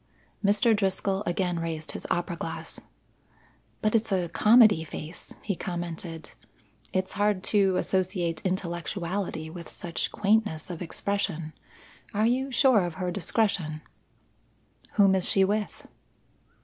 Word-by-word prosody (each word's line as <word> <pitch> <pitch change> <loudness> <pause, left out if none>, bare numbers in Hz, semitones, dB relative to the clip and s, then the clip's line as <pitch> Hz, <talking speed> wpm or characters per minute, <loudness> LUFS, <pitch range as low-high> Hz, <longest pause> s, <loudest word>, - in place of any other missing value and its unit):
Mr. 205 +3 +4
Driscoll 195 -1 0
again 175 0 0
raised 160 -2 -3
his - - -6
opera 175 0 -1
glass. 165 -1 -5 1.0
"But 215 - +2
it's 225 -1 +1
a 180 -3 +1
comedy 215 -2 +6
face," 160 +2 -8
he 200 - -1
commented. 170 -2 -5 0.6
"It's 185 0 -1
hard 205 -2 +1
to 195 -3 +4
associate 180 -4 0
intellectuality 175 -2 -3
with 170 -1 -9
such 170 -1 -3
quaintness 205 -6 +1
of 170 - -7
expression. 175 -3 -2 0.6
Are 215 +2 +3
you 260 +3 +1
sure 255 -5 +5
of 175 -2 -4
her 180 0 -2
discretion?" 175 -5 0 1.1
"Whom 195 -2 +5
is 190 -2 +4
she 195 -1 +4
with?" 210 +1 -2
185 Hz, 125 wpm, -27 LUFS, 170-205 Hz, 1.1 s, comedy